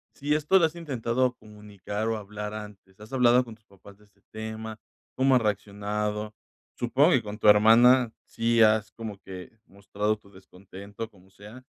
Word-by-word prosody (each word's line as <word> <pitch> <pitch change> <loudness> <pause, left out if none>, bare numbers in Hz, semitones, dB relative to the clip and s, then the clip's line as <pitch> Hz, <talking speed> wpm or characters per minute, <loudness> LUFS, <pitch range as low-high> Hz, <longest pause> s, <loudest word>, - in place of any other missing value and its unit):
si 145 +2 -1
esto 155 +5 +3
lo 170 - +4
has 160 - -2
intentado 130 -5 -1
comunicar 105 0 -7
o 115 -1 -1
hablar 105 +1 -7
antes. 105 -2 -11
¿Has 110 +4 -13
hablado 125 -1 +4
con 115 - -10
tus 110 - -32
papás 100 +1 -17
de 105 - -22
este 100 -1 -33
tema? 110 0 -7 0.4
¿Cómo 130 0 +3
han 125 - +3
reaccionado? 105 +1 -3 0.5
Supongo 135 +8 +3
que 130 - +3
con 105 0 -7
tu 105 - +1
hermana 115 +3 +6
sí 115 0 +1
has, 110 0 +3
como 110 -4 -8
que, 95 -2 -10 0.2
mostrado 100 +2 -3
tu 100 -1 -22
descontento, 100 +3 -10
como 95 -1 -22
sea. 105 +6 -14
110 Hz, 175 wpm, -26 LUFS, 105-120 Hz, 0.5 s, hermana